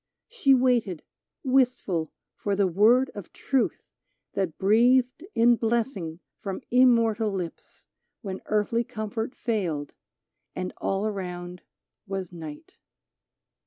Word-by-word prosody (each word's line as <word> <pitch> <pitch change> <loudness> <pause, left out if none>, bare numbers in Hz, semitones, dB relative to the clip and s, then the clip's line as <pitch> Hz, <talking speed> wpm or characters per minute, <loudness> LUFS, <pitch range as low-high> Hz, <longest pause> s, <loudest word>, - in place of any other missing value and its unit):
She 345 - +4
waited, 240 -9 +1 0.4
wistful, 250 - +1 0.2
for 200 -1 -1
the 200 0 +3
word 220 +9 +4
of 205 -4 -9
truth 270 -3 -1 0.5
That 185 -6 -2
breathed 245 - +3
in 235 +1 +5
blessing 220 -8 -1 0.2
from 195 -2 -5
immortal 230 -3 +4
lips 180 -4 -6 0.4
When 190 -2 -5
earthly 215 +2 +1
comfort 225 0 -4
failed, 175 -11 -2 0.6
and 185 0 -4
all 195 +2 -1
around 180 -4 -5 0.5
was 190 -2 -4
night. 160 -4 -10
210 Hz, 105 wpm, -26 LUFS, 185-240 Hz, 0.6 s, in